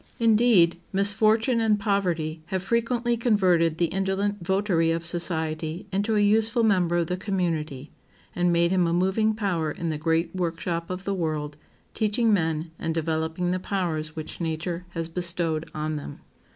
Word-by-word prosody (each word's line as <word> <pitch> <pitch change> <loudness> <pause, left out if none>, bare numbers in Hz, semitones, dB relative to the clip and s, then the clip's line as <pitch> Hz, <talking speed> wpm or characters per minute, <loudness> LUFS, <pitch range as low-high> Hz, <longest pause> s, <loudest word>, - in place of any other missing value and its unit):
Indeed, 220 -7 +4
misfortune 220 +4 +3
and 215 -2 +2
poverty 175 -6 -1
have 190 0 -2
frequently 235 +2 0
converted 185 -9 +2
the 175 - +3
indolent 195 +3 -1
votary 190 -3 +1
of 165 0 -1
society 160 -1 -2
into 205 +3 0
a - - +3
useful 220 +3 +3
member 180 -5 +2
of 170 - +1
the 180 - -2
community, 165 -8 -3 0.4
and 175 -1 +2
made 170 0 +3
him 180 -2 +2
a 170 - 0
moving 190 +5 +1
power 180 -7 -1
in 165 +2 -4
the 150 - -4
great 165 +3 0
workshop 170 -1 -2
of 185 +1 -5
the 200 - -2
world, 155 -5 -2 0.4
teaching 220 +1 +2
men, 160 -3 0
and 165 -1 -2
developing 160 +2 -1
the 185 - -1
powers 165 -5 -2
which 160 +2 -7
nature 170 +2 -3
has 165 -1 -2
bestowed 170 -2 -2
on 155 0 -2
them. 145 - -8
175 Hz, 160 wpm, -25 LUFS, 165-205 Hz, 0.4 s, Indeed